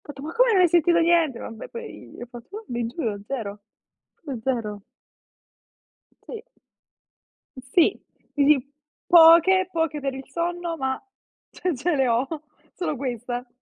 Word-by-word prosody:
fatto: 280 Hz, -2 st, -10 dB
"Ma 315 Hz, +3 st, -6 dB
come -, -, +3 dB
non 380 Hz, -3 st, +5 dB
hai 355 Hz, -, +5 dB
sentito 340 Hz, +1 st, +3 dB
niente?" 330 Hz, -6 st, +2 dB
Vabbè, 225 Hz, -1 st, -8 dB
poi 470 Hz, -1 st, -10 dB
gli -, -, -12 dB
ho -, -, -6 dB
fatto, 250 Hz, -, -10 dB
di 240 Hz, -5 st, -3 dB
"Giuro, 230 Hz, -5 st, -4 dB
zero, 210 Hz, -6 st, -5 dB, 0.5 s
proprio 275 Hz, -8 st, -7 dB
zero." 215 Hz, -6 st, -3 dB, 1.4 s
Sì. 450 Hz, -2 st, -8 dB, 1.1 s
Sì. 260 Hz, +6 st, +1 dB, 0.3 s
Uhm, 290 Hz, 0 st, +4 dB, 0.5 s
poche 345 Hz, +2 st, +7 dB
poche 325 Hz, -3 st, -1 dB
per 275 Hz, -1 st, -3 dB
il 265 Hz, 0 st, -9 dB
sonno, 345 Hz, 0 st, -3 dB
ma 265 Hz, -3 st, -2 dB, 0.5 s
ce 360 Hz, -2 st, -2 dB
ce 335 Hz, +7 st, 0 dB
le 265 Hz, -3 st, +2 dB
ho, 235 Hz, +3 st, +1 dB, 0.5 s
solo 315 Hz, -5 st, -3 dB
questa. 245 Hz, -1 st, -4 dB
290 Hz, 140 wpm, -24 LUFS, 245-345 Hz, 1.4 s, poche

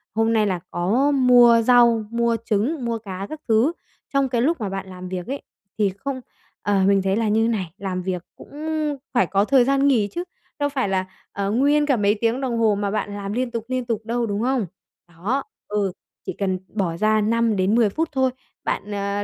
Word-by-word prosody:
hôm 225 Hz, +1 st, +2 dB
nay 215 Hz, -2 st, +3 dB
là 185 Hz, -3 st, -1 dB
có 225 Hz, +12 st, +2 dB
mua 245 Hz, -3 st, +6 dB
rau, 235 Hz, -2 st, +5 dB
mua 235 Hz, 0 st, +1 dB
trứng, 240 Hz, +7 st, 0 dB
mua 230 Hz, -1 st, -1 dB
cá 195 Hz, -3 st, -6 dB
các 310 Hz, 0 st, -7 dB
thứ. 230 Hz, +6 st, +3 dB, 0.4 s
Trong 275 Hz, -1 st, +2 dB
cái 240 Hz, -2 st, +1 dB
lúc 305 Hz, +2 st, +1 dB
mà 205 Hz, -, -2 dB
bạn 195 Hz, 0 st, -5 dB
làm 185 Hz, 0 st, -8 dB
việc 180 Hz, -1 st, -5 dB
ấy 275 Hz, +2 st, -4 dB, 0.4 s
thì 210 Hz, -2 st, +3 dB
không 270 Hz, +2 st, -4 dB, 0.4 s
ờ, 200 Hz, -2 st, +2 dB
mình 200 Hz, -1 st, +4 dB
thấy 190 Hz, 0 st, +1 dB
là 225 Hz, 0 st, +1 dB
như 220 Hz, +2 st, +3 dB
này, 195 Hz, -8 st, -2 dB
làm 185 Hz, -2 st, -3 dB
việc 180 Hz, -2 st, -3 dB
cũng -, -, -14 dB, 0.6 s
phải 240 Hz, -8 st, +3 dB
có 200 Hz, +2 st, +2 dB
thời 260 Hz, 0 st, +4 dB
gian 275 Hz, +1 st, +3 dB
nghỉ 230 Hz, -7 st, +3 dB
chứ 345 Hz, -, -3 dB, 0.4 s
đâu 290 Hz, 0 st, +1 dB
phải 265 Hz, -7 st, -1 dB
là, 190 Hz, -1 st, 0 dB, 0.3 s
ờ, 200 Hz, 0 st, -2 dB
nguyên 290 Hz, +6 st, +3 dB
cả 280 Hz, -3 st, +3 dB
mấy 205 Hz, 0 st, +2 dB
tiếng 230 Hz, +3 st, +1 dB
đồng 250 Hz, -3 st, -1 dB
hồ 220 Hz, -2 st, +3 dB
mà 200 Hz, 0 st, -2 dB
bạn 205 Hz, -1 st, -2 dB
làm 200 Hz, 0 st, -4 dB
liên 250 Hz, +1 st, -1 dB
tục, 230 Hz, -2 st, -4 dB
liên 255 Hz, -1 st, -2 dB
tục 220 Hz, -2 st, -3 dB
đâu, 235 Hz, +1 st, -1 dB
đúng 205 Hz, -1 st, -2 dB
không? 250 Hz, -2 st, +1 dB, 0.4 s
Đó. 195 Hz, +11 st, -2 dB, 0.2 s
Ừ. 205 Hz, -2 st, 0 dB, 0.3 s
Chỉ -, -, -3 dB
cần 190 Hz, -2 st, -1 dB
bỏ 180 Hz, -6 st, -1 dB
ra 215 Hz, +2 st, +3 dB
5-10 220 Hz, -1 st, +2 dB
phút 320 Hz, +10 st, -2 dB
thôi, 265 Hz, -2 st, +1 dB, 0.3 s
bạn, 210 Hz, -, -3 dB
ờ, 200 Hz, 0 st, -2 dB
225 Hz, 210 wpm, -22 LUFS, 200-250 Hz, 0.6 s, mua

